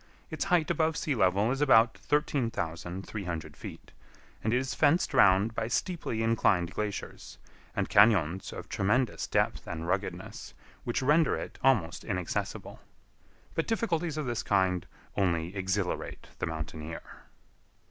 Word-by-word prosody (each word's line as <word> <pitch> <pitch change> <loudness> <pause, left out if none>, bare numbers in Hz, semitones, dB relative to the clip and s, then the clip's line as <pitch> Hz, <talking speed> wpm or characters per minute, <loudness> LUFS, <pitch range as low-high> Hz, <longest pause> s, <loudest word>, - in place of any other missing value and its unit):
Its 155 - -2
height 175 -4 +2
above 160 -1 +1
sea 150 - 0
level 100 0 +2
is 135 +2 -2
about 115 -5 +5
13,300 95 - -2
feet, - - -10 0.5
and 110 - +1
it 125 - +3
is 130 +1 -2
fenced 160 +1 +3
round 100 -3 +5
by 110 -1 -2
steeply 120 -4 -1
inclined 95 -6 +2
glaciers, 105 -1 -5 0.4
and - - 0
cañons 95 -4 +4
of - - -7
tremendous 110 +4 0
depth - - 0
and 80 0 -4
ruggedness, 95 +3 -4 0.3
which 120 +2 -1
render 150 +3 +4
it - - -7
almost 105 -11 +2
inaccessible. 90 -3 -3 0.7
But 165 - -1
difficulties 175 -8 0
of 155 - -2
this 120 -2 -1
kind 95 -3 +1 0.3
only 85 -1 0
exhilarate 95 -1 -2
the - - -1
mountaineer. 80 0 -5
110 Hz, 130 wpm, -29 LUFS, 90-135 Hz, 0.7 s, about